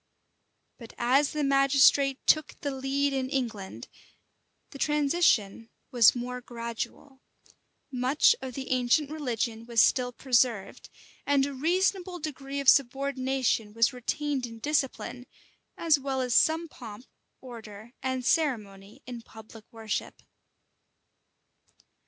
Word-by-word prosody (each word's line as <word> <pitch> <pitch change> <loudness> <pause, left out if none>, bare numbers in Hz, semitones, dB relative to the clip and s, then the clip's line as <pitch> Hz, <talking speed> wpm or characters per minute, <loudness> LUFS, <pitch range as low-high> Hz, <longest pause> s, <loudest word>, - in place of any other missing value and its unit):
But 230 -2 -12
as 265 +4 +2
the 300 -1 -2
magistrate 275 0 +3
took 310 -1 +2
the 285 - -2
lead 275 +1 -1
in 260 -1 -2
England, 230 -8 -4 0.8
the 275 - -11
transition 280 - +1 0.2
was 240 -4 +6
more 250 +1 -5
gradual; 240 +3 -7 0.7
much 260 +3 +3
of 260 -2 -7
the 265 -1 -6
ancient 255 +4 +1
religion 235 -6 -3
was 235 -1 0
still 245 +3 +3
preserved, 240 -5 0 0.3
and 280 -1 +2
a 285 - -5
reasonable 360 +5 0
degree 280 -3 -6
of 280 - -5
subordination 260 -4 +1
was 230 +3 +3
retained 265 +1 -3
in 230 -1 -11
discipline, 265 -2 -2 0.5
as 320 -4 +3
well 270 -1 -3
as 250 -2 -1
some 325 +1 +3
pomp, 235 -4 -11 0.3
order, 225 -3 -11
and 260 -1 -3
ceremony 220 - -1
in 240 -1 -8
public 220 -1 -14
worship. 220 -2 -5
260 Hz, 115 wpm, -27 LUFS, 235-280 Hz, 0.8 s, was